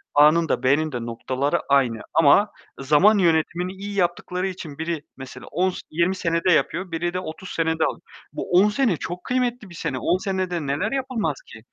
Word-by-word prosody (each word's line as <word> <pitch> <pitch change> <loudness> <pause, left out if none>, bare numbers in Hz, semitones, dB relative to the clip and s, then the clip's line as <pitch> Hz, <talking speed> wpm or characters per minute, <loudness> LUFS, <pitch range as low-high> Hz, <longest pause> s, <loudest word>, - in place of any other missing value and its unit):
A'nın 155 +3 +5
da - - 0
B'nin 150 +4 +2
de 120 -3 -4
noktaları 130 +4 -1
aynı. 125 -5 +3
Ama 165 +7 +5 0.3
zaman 150 +10 +4
yönetimini 175 0 +1
iyi 200 +1 -7
yaptıkları 180 0 -1
için 165 -6 -7
biri 160 -2 -3
mesela 130 -1 -10
10 185 +4 +1
s 185 - -6
20 170 +4 +1
senede 170 0 +1
yapıyor, 180 +1 +1
biri 170 +2 -2
de 180 - -1
30 180 +1 -8
senede 160 -1 0
al - - -3 0.3
Bu - - -5
10 185 +4 +5
sene 215 - +1
çok 175 +3 -6
kıymetli 245 -4 -1
bir 170 - -12
sene. 130 -5 -3
10 175 - +1
senede 185 -2 -2
neler 150 +10 -1
yapılmaz 260 -4 -1
ki? - - -12
170 Hz, 185 wpm, -23 LUFS, 155-190 Hz, 0.3 s, A'nın